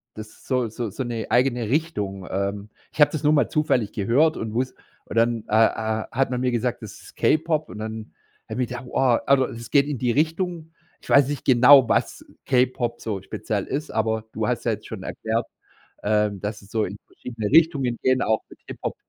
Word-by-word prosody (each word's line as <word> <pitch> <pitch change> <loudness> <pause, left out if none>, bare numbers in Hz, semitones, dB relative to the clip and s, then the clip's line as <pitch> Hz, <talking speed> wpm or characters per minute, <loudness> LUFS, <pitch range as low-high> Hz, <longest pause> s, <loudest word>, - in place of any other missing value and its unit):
das 110 0 -8
ist - - -20
so 125 -3 +1
so 110 0 -4
so 130 +7 -4
'ne 115 -2 -4
eigene 120 -3 +2
Richtung. 105 - -2
Ähm. 100 +2 -3 0.2
Ich 150 - -3
habe 145 - +6
das 155 -1 -4
nur 150 - +4
mal 145 - +2
zufällig 130 -8 +1
gehört 130 +11 +2
und 110 -1 -4
wuss 130 +2 -1 0.3
und - - -8
dann, 115 -1 +2
äh, - - -4
äh, 110 0 -2
hat 135 +2 +1
man 125 - -1
mir 125 0 0
gesagt, 120 0 -1
das 110 - -8
ist - - -15
K-Pop. 155 0 +1
Und 105 - -9
dann 110 0 -6 0.4
habe 110 +4 -3
ich 120 - -4
gedacht: 125 +1 -6
„Boah.” 125 -1 +2
Also, 135 -2 +4
es 115 0 -9
geht 140 +3 +4
in 145 - -3
die 120 +1 0
Richtung, 165 +3 -1 0.3
ich - - -15
weiß 140 -2 +6
nicht 145 -2 -4
genau, 130 +1 +7
was - - 0 0.2
K-Pop 125 -2 0
so 100 -4 -4
speziell 100 +1 -3
ist, 150 +3 -4
aber 110 0 0
du - - -2
hast - - -1
ja - - +2
jetzt - - -5
schon - - -7
erklärt, 110 +1 -2 0.6
ähm, 105 -1 +1
dass 105 0 -4
es 100 0 -18
so 110 -2 +1
in 100 +3 -7
verschiedene 115 -4 -6
Richtungen 140 -7 +3
geht, 130 0 +2
auch 110 0 +1
mit - - -15
Hip - - -8
Hop, - - -2
120 Hz, 215 wpm, -23 LUFS, 110-135 Hz, 0.6 s, genau